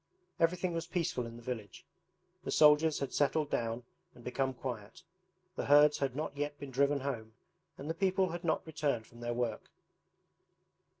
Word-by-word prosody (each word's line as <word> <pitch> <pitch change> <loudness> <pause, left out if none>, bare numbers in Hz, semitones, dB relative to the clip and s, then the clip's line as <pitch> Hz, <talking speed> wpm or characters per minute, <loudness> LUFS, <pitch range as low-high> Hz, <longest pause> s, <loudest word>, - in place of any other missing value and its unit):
Everything 175 +1 +2
was 165 0 -3
peaceful 165 -9 -1
in 115 - -9
the 120 - -11
village. 115 -6 -6 0.6
The - - -5
soldiers 150 +1 +6
had 140 - -3
settled 145 +1 +1
down 115 +1 -1 0.3
and 120 - -14
become 130 +2 0
quiet. 120 -5 -6 0.5
The - - -2
herds 145 +1 +6
had 135 -2 -1
not 150 -1 -3
yet 145 0 -3
been 140 -2 -8
driven 140 +2 +2
home 115 -5 -4 0.4
and 140 - -7
the 160 - 0
people 190 +1 +2
had 175 +2 -5
not 160 -2 0
returned 145 -7 -1
from 120 - -16
their 120 0 -2
work. 120 -3 -2
140 Hz, 170 wpm, -33 LUFS, 120-155 Hz, 0.6 s, soldiers